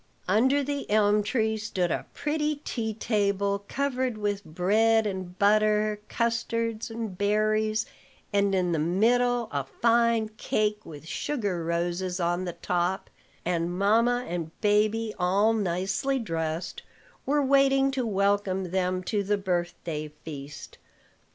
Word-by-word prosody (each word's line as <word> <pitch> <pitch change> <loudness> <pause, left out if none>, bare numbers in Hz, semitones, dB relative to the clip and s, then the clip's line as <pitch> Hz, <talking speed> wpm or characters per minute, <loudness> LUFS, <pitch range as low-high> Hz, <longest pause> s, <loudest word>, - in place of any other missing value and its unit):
Under 260 +9 +3
the 285 +1 -4
elm 210 0 +4
tree 220 0 0
stood 190 -5 -1
a - - -2
pretty 300 0 -1
tea 220 -3 -3
table, 200 -2 0
covered 260 -4 -1
with 205 -1 -2
bread 215 +7 +2
and 185 -3 -4
butter, 210 +1 +3
custards, 230 -1 -1
and 225 -4 -5
berries, 215 +2 +1 0.5
and 200 -1 +2
in 180 -2 +1
the 165 - +1
middle 235 +8 +2
a 140 -2 -1
fine 230 - +2
cake 210 0 0
with 150 -1 -10
sugar 200 - -2
roses 175 +2 -1
on 175 +1 0
the 175 - -4
top; 175 +2 -2 0.3
and 175 0 -1
mamma 230 +5 +3
and 170 -2 -3
baby, 215 +1 +2
all 200 +5 +3
nicely 195 +6 0
dressed, 165 -6 -3 0.5
were 290 +1 +2
waiting 275 0 +4
to 265 -2 -1
welcome 200 -3 0
them 185 0 0
to 205 +3 0
the 205 +1 0
birthday 175 -4 -3 0.2
feast. 145 -2 -9
205 Hz, 130 wpm, -27 LUFS, 180-225 Hz, 0.5 s, elm